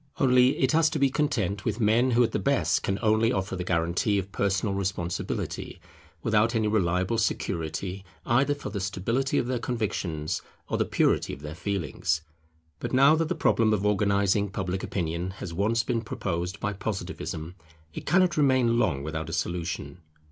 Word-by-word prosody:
Only 125 0 +4
it 130 -1 +2
has 160 0 +4
to - - -2
be 140 -2 +3
content 110 - 0
with 110 -1 -2
men 115 +3 +3
who 120 0 +4
at 115 - 0
the - - -1
best 140 -1 +1
can 95 - -1
only 110 +2 +3
offer 95 -4 -2
the 90 - -3
guarantee 90 +5 +1
of 95 0 -3
personal 100 +1 0
responsibility, 95 -3 -3 0.4
without 110 +1 +2
any 110 -1 +2
reliable 95 0 +1
security 90 -1 -2 0.2
either 135 +4 +2
for 145 - -7
the 100 - -3
stability 105 +8 -1
of - - +1
their 125 0 -1
convictions 100 - -2 0.3
or - - -2
the - - +2
purity - - +1
of 70 - -15
their 75 0 -5
feelings. 80 -4 -2 0.6
But - - -4
now 135 +4 +6
that 160 0 0
the 180 - 0
problem 115 -7 +3
of 100 0 -3
organizing 100 0 +2
Public 95 -1 -3
Opinion 85 +1 -3
has 85 -3 -6
once 110 +6 +1
been 120 -1 -1
proposed 90 -3 -3
by 105 - -2
Positivism, 95 -4 -5 0.4
it - - -8
cannot 180 +1 +3
remain 130 -5 +3
long 85 - +1
without 80 +1 -4
a - - -5
solution. 85 +1 -3
100 Hz, 175 wpm, -27 LUFS, 90-120 Hz, 0.6 s, now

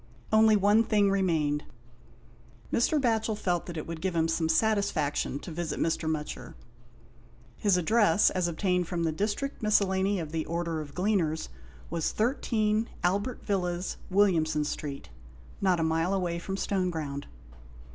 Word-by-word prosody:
Only 220 0 +6
one 205 +2 +4
thing 205 -3 +2
remained. 160 -7 +1 1.1
Mr. 295 +6 +2
Batchel 225 -4 +1
felt 175 -4 -1
that 170 -2 -6
it 155 - -4
would 165 -1 -6
give 185 -1 -1
him 165 0 +2
some 165 0 0
satisfaction 160 - +1
to 175 - -8
visit 165 -1 -3
Mr. 165 -1 0
Mutcher. 155 -1 -4 1.0
His 200 -3 +3
address, 205 +1 +4
as 180 -2 0
obtained 180 +1 0
from 170 -1 -2
the 165 - +1
District 210 - -2
Miscellany 200 -2 +2
of 160 -3 -5
the 160 -1 -2
Order 170 -1 -2
of 145 -2 -10
Gleaners, 180 -5 0 0.4
was 165 -2 -1
13, 220 -2 0
Albert 200 +8 -1
Villas, 180 -3 -1
Williamson 165 -6 +2
Street, 145 -1 -5 0.5
not 185 -3 +2
a - - +1
mile 165 +4 +1
away 175 -3 -1
from 190 +3 -4
Stoneground. 160 -9 -2
180 Hz, 145 wpm, -28 LUFS, 160-205 Hz, 1.1 s, Only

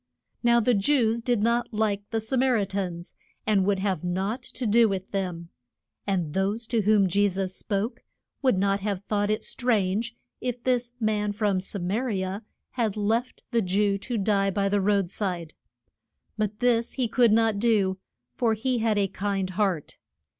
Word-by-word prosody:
Now 235 0 +4
the 245 +2 +3
Jews 230 +1 +2
did 240 -3 +1
not 235 +1 +1
like 210 -2 0
the 225 - -1
Sa 220 +5 -2
mar 255 -1 +3
i 205 - +1
tans, 185 -3 -4 0.3
and 205 -3 +3
would 200 -1 +2
have 190 -4 -1
nought 190 +7 -2
to 255 - -6
do 225 +1 +5
with 190 -1 -4
them. 180 -4 -3 0.6
And 180 -6 -1
those 200 +4 -1
to 230 -2 +2
whom 205 -1 +4
Je 200 +3 +3
sus 190 -1 -2
spoke 205 +4 -3 0.4
would 255 -8 +3
not 195 +1 +2
have 200 -1 -3
thought 205 0 0
it 215 - 0
strange 225 -1 0 0.2
if 245 -1 -4
this 245 -1 0
man 210 -2 0
from 205 -2 +1
Sa 195 +2 -4
ma 185 +3 -1
ri 220 -7 -1
a 190 +3 -4 0.3
had 225 -5 -1
left 225 +4 -1
the 235 -2 +2
Jew 200 +1 +1
to 240 +3 -3
die 195 -1 +2
by 200 +1 0
the 205 0 +2
road 200 -2 +1
side. 180 -6 -3 0.8
But 210 0 -2
this 235 -2 +2
he 255 -3 0
could 235 0 +4
not 225 -2 +3
do, 200 -4 +2 0.3
for 225 - +1
he 250 +3 -1
had 220 -2 +1
a 200 -1 +2
kind 195 -1 -2
heart. 185 -5 -1
205 Hz, 180 wpm, -26 LUFS, 195-230 Hz, 0.8 s, do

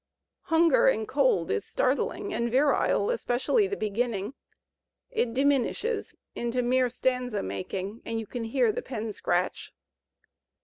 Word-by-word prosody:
"Hunger 325 -2 +4
and 220 -4 +2
Cold" 260 - +2
is 100 - 0
startling 350 +9 -1
and 235 -7 0
virile, 285 - +2
especially 410 - +1
the 405 - -3
beginning; 215 0 -2 0.8
it 440 - 0
diminishes 280 - 0 0.2
into 240 +1 -1
mere 250 +1 +2
stanza 250 -2 -1
making 185 - -5
and 230 0 -3
you 225 - -5
can 235 +2 -5
hear 355 - +2
the 480 +3 -4
pen 225 - -5
scratch. - - -1
250 Hz, 130 wpm, -27 LUFS, 225-290 Hz, 0.8 s, Hunger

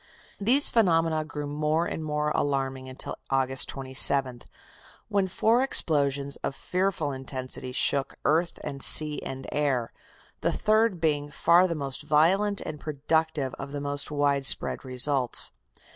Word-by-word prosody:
These 250 +8 +4
phenomena 165 -7 +1
grew 150 -1 -7
more 150 +3 -1
and 160 - -5
more 150 0 -2
alarming 135 -2 -2
until 130 - -6
August 135 -1 0
27th, 130 -1 +2 0.6
when 200 -2 0
four 225 +6 +1
explosions 140 - 0
of 135 - -5
fearful 180 -5 -2
intensity 130 -1 -6
shook 135 +1 0
earth 165 +2 0
and 140 -2 -7
sea 150 +1 +3
and 135 0 -7
air, 135 -6 -2 0.5
the - - -1
third 215 -3 +1
being 145 -2 -1
"far 170 +5 +3
the 170 - -4
most 140 -3 -5
violent 195 +7 +1
and 150 - -7
productive 155 -1 -2
of 140 +1 -8
the 145 - -4
most 145 0 -3
widespread 145 -2 +4
results." 130 0 +2
145 Hz, 135 wpm, -26 LUFS, 135-165 Hz, 0.6 s, These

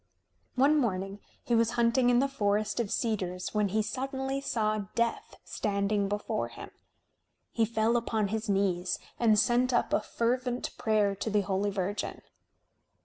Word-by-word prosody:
One 285 +4 +4
morning 195 -4 -2 0.2
he 240 - -1
was 230 0 +3
hunting 235 +1 +3
in 245 - +4
the 270 +3 +3
forest 210 -4 0
of 230 -4 -1
cedars 185 -6 -2
when 210 -1 +2
he 215 +3 0
suddenly 265 +4 -3
saw 215 -6 -1
Death 235 0 -1
standing 200 -1 -1
before 205 0 -2
him. - - -10 0.8
He 225 - +2
fell 225 +1 +1
upon 220 -3 0
his 220 +1 -3
knees 190 -2 +1 0.2
and 220 -3 +4
sent 245 +3 +3
up 240 - +1
a - - +3
fervent 245 +3 -1
prayer 215 -3 +2
to 220 - -3
the 210 -1 +2
Holy 195 +1 0
Virgin. 200 +1 -3
220 Hz, 150 wpm, -29 LUFS, 200-240 Hz, 0.8 s, One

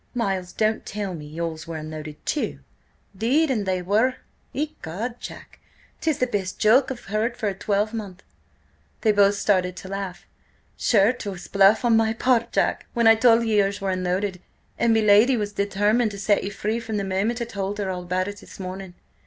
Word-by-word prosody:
"Miles, 195 -6 -1
don't 220 0 0
tell 200 -2 -4
me 150 -3 -8
yours 160 0 -5
were 165 -1 -5
unloaded, 155 -1 -8
too?" 300 - -2 0.5
"'Deed 270 +9 +2
an' 215 -6 0
they 185 -1 -1
were! 220 +7 +2 0.4
Ecod, 235 - -4
Jack! - - -10 0.4
'tis 315 -4 0
the 255 - +2
best 200 -6 -3
joke 250 +5 +4
I've 260 -2 -7
heard 220 +4 -1
for 215 - -2
a 200 - 0
twelvemonth." 205 -1 -2 0.8
They 220 - +4
both 205 -1 +4
started 185 -3 +1
to 185 - -9
laugh. 195 -2 -5 0.5
"Sure 215 +1 +3
'twas 200 -7 -7
bluff 200 +4 +4
on 235 -1 +5
my 225 0 +3
part, 235 0 +1
Jack, - - 0
when 235 -1 +2
I 225 - +9
told 230 +1 +4
ye 215 -2 +2
yours 200 0 +1
was 195 -1 -1
unloaded 185 +1 -2 0.4
And 235 - +3
me 225 0 +4
lady 215 +5 +5
was 205 -1 -3
determined 205 +3 +1
to 200 - -8
set 200 +1 +2
you 195 - -2
free 210 +3 -2
from 225 -2 -4
the 200 - -1
moment 195 +5 -1
I 235 - -2
told 200 -2 -4
her 200 -2 -2
all 180 -1 -4
about 180 +1 -1
it 205 0 -6
this - - -13
morning. 185 -1 -7
205 Hz, 195 wpm, -24 LUFS, 190-225 Hz, 0.8 s, I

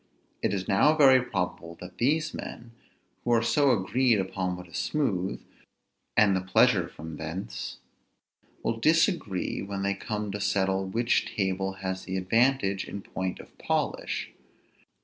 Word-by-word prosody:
It - - +1
is 95 -2 -2
now 150 +11 +4
very 135 -4 +7
probable 90 -6 -4
that 90 0 -11
these 155 +6 +1
men, 115 0 -8 0.5
who 120 - +2
are 115 -1 +3
so 140 +5 +3
agreed 120 +1 +2
upon 95 -1 -2
what 90 0 -10
is 85 - -12
smooth, 100 -12 -1 0.7
and 110 -2 +6
in - - +3
the 95 - +1
pleasure 95 0 +3
from 80 -1 -9
thence, 80 -5 -5 0.9
will 115 - 0
disagree 160 - +1
when 100 0 -4
they 100 0 +1
come 105 +1 -4
to 105 +1 -4
settle 95 -1 +1
which 115 +5 +1
table 95 -1 -1
has 95 -1 -5
the 95 0 -3
advantage 100 0 +2
in 100 - -7
point 95 -1 -4
of - - -14
polish. - - -2
100 Hz, 150 wpm, -28 LUFS, 95-120 Hz, 0.9 s, very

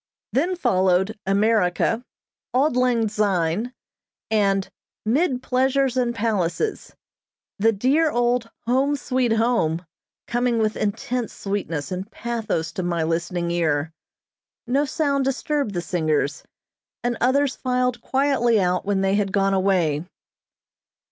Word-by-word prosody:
Then 340 +8 +1
followed 190 - +1
"America," 210 +2 +2 0.5
"Auld 270 +1 +3
Lang 245 -3 +2
Syne," 205 0 0 0.6
and 195 -3 +2 0.4
"'Mid 255 +2 +1
Pleasures 265 0 +1
and 245 -2 0
Palaces," 220 - -1 0.6
the 225 +3 +4
dear 270 +10 +2
old 240 -2 +1 0.2
"Home, 265 +4 +2
Sweet 255 -3 0
Home" 220 -8 +1 0.4
coming 240 0 0
with 215 -1 +1
intense 225 +3 -2
sweetness 195 -6 -3
and 185 +3 -4
pathos 225 -10 -3
to - - -4
my 170 -2 -1
listening 170 +1 -1
ear. 160 -2 0 0.7
No 275 +5 +1
sound 280 -1 0
disturbed 270 -3 -1
the 175 - 0
singers, 155 -4 0 0.6
and 240 0 0
others 270 +2 +2
filed 250 -1 -1
quietly 260 -4 +2
out 180 -1 +1
when 200 -1 +1
they 195 0 +2
had 200 -1 +1
gone 195 0 +2
away. 180 -6 +1
225 Hz, 120 wpm, -23 LUFS, 185-250 Hz, 0.7 s, the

